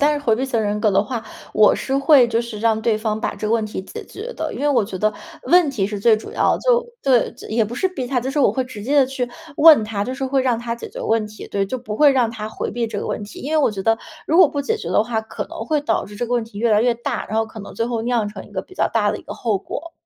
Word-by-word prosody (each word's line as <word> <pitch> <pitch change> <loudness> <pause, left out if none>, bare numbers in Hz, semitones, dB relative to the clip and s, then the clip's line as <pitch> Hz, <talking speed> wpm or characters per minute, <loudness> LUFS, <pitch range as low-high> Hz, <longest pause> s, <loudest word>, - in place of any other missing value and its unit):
但 290 +1 +4
是 - - -1
回 225 - +4
避 240 - -3
型 245 -3 -1
人 210 -1 -1
格 215 - +3
的 195 +1 +2
话， 235 0 -4 0.3
我 215 -1 +5
是 270 - -1
会 275 -3 +6
就 230 0 0
是 235 -3 -6
让 220 0 +1
对 220 0 +1
方 215 0 -2
把 - - -2
这 215 - -4
个 215 - 0
问 230 -1 +2
题 210 -3 -5
解 445 - -8
决 455 +5 -7
的。 - - -4
因 - - -6
为 295 - +2
我 275 -6 +3
觉 195 -2 -5
得 215 +2 +1 0.3
问 350 -3 +4
题 210 -8 -1
是 205 0 -5
最 225 +1 +5
主 215 - -9
要 - - +2
的， - - -3
就 - - +2 0.2
对， 255 -4 +3
就 - - -12
也 225 +1 +1
不 220 +3 -3
是 375 - +1
逼 275 -9 -5
他， 255 0 0
就 255 +2 -2
是 290 - -2
我 280 - +5
会 260 - -1
直 250 -5 -9
接 275 +7 0
地 265 - +4
去 260 -2 -3 0.3
问 305 -7 +8
他， 210 -2 -3
就 255 +5 -3
是 270 0 -3
会 265 +1 +1
让 250 -3 +1
他 235 0 -3
解 235 - -8
决 - - -10
问 225 -1 +1
题。 215 0 -10
对， 200 -1 -1
就 255 - -3
不 235 -4 -6
会 295 +5 +6
让 250 -4 +2
他 215 -2 -6
回 - - -4
避 235 -1 -2
这 220 - -4
个 - - -4
问 - - -3
题。 205 0 -9
因 280 - -5
为 315 - +3
我 295 - +3
觉 200 -2 -5
得 225 +2 +2 0.3
如 325 - +3
果 365 -5 +8
不 285 0 -3
解 - - -1
决 170 - -6
的 195 +4 +2
话， 225 -1 -1
可 220 - -6
能 - - -10
会 305 -2 +1
导 290 - 0
致 205 - -11
这 240 +3 -2
个 240 - -4
问 240 -1 +2
题 225 -2 -10
越 230 +1 +1
来 210 -1 +4
越 240 +1 +2
大， 240 0 -4
然 215 - -2
后 225 - +2
可 220 0 -10
能 205 - -10
最 230 - -1
后 235 -1 -2
酿 235 -2 0
成 200 -2 -9
一 - - -18
个 190 -2 -4
比 370 - -17
较 - - +1
大 210 -3 +1
的 - - -4
一 - - -13
个 - - -8
后 220 -5 -1
果。 330 - -7
235 Hz, 355 characters per minute, -21 LUFS, 215-265 Hz, 0.3 s, 问